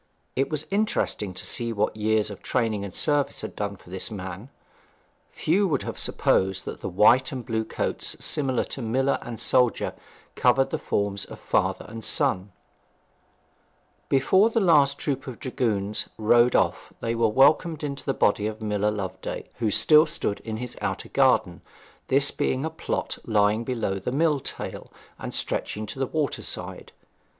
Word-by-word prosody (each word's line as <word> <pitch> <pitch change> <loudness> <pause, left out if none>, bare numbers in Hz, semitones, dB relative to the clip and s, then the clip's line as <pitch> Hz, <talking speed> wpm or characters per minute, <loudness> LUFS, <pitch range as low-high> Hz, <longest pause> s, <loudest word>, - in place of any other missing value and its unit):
It 135 +2 +1
was 155 -1 -3
interesting 200 - 0
to - - -6
see 115 -1 -2
what 105 -1 0
years 110 0 +1
of 100 - -9
training 110 -5 0
and 100 - -5
service 145 +8 +1
had - - -7
done 100 -1 -3
for 90 - -17
this 95 - -3
man. 95 +2 -7 0.8
Few 195 +5 +1
would 165 - 0
have - - -5
supposed 95 0 +1
that - - -6
the - - -3
white 115 +8 +4
and 130 -2 -5
the - - -24
blue 110 -2 -1
coats 110 - -3
of 135 -3 -1
miller 130 +5 +1
and 120 -2 -7
soldier 125 -2 +2 0.4
covered 125 +2 +3
the - - -1
forms 100 -1 -1
of - - -11
father - - 0
and 115 +1 -8
son. 95 -1 +1 1.6
Before 190 - +4
the 230 - +1
last 145 -7 +4
troop 135 -3 -3
of 125 -3 -6
dragoons 105 -5 -1
rode 120 +3 +4
off - - +1
they 115 - -1
were 115 -1 +2
welcomed 150 +6 +3
in 140 -2 -2
a 135 - +2
body 105 +1 +2
by 110 0 -7
Miller 105 0 +1
Loveday, 95 -3 -5
who 115 -3 +1
still 155 - +5
stood 150 -10 -2
in 110 -1 -5
his 125 +1 -5
outer - - -3
garden, - - +2 0.5
this 140 +2 +3
being 130 +3 -1
a 160 - -3
plot 160 - -3
lying 105 +1 +2
below 115 -6 -2
the 100 - -3
mill 150 +1 +2
tail, - - -6 0.3
and - - -5
stretching 105 +1 -2
to 130 - -8
the 135 - 0
water 150 0 -1
side. - - -5
115 Hz, 170 wpm, -25 LUFS, 105-140 Hz, 1.6 s, still